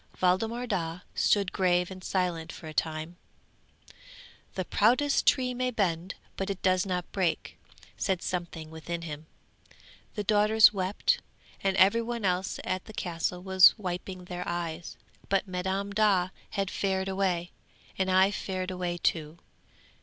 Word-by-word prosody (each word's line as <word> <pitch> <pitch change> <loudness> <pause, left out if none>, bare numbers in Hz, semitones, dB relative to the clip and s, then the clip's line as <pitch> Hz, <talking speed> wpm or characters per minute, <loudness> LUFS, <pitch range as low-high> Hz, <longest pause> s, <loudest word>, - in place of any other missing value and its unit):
Waldemar 220 +7 +1
Daa 175 -6 -2
stood 200 -3 +2
grave 180 -1 +2
and 185 -1 -9
silent 175 -4 -1
for - - -11
a 155 - -7
time; 160 +2 -2 1.4
"The 185 - -2
proudest 255 +10 +3
tree 255 -2 +3
may 255 +1 -1
bend, 185 -5 -1 0.2
but 195 +1 -2
it 195 -1 -4
does 185 +1 +2
not 180 -2 -3
break," 185 -4 -1 0.4
said 190 -3 -1
something 170 -3 -4
within 170 +1 -5
him. 155 -1 -7 0.9
The 210 - -2
daughters 210 +1 +6
wept, 190 0 +1 0.4
and 195 0 +1
every 200 +5 +5
one 230 -2 -3
else 185 +1 0
at 185 0 -2
the 220 - -11
Castle 180 -1 -3
was 190 +1 +7
wiping 185 -1 -5
their 180 0 -5
eyes; 170 -1 -4 0.3
but 195 +1 +1
Madam 190 +2 -2
Daa 200 -3 +3 0.2
had 195 -3 -2
fared 190 -1 -1
away, 185 -3 -1 0.4
and 190 0 0
I 190 +1 +5
fared 185 -2 -3
away 180 -1 -2
too! 160 -2 -1
185 Hz, 145 wpm, -29 LUFS, 175-200 Hz, 1.4 s, was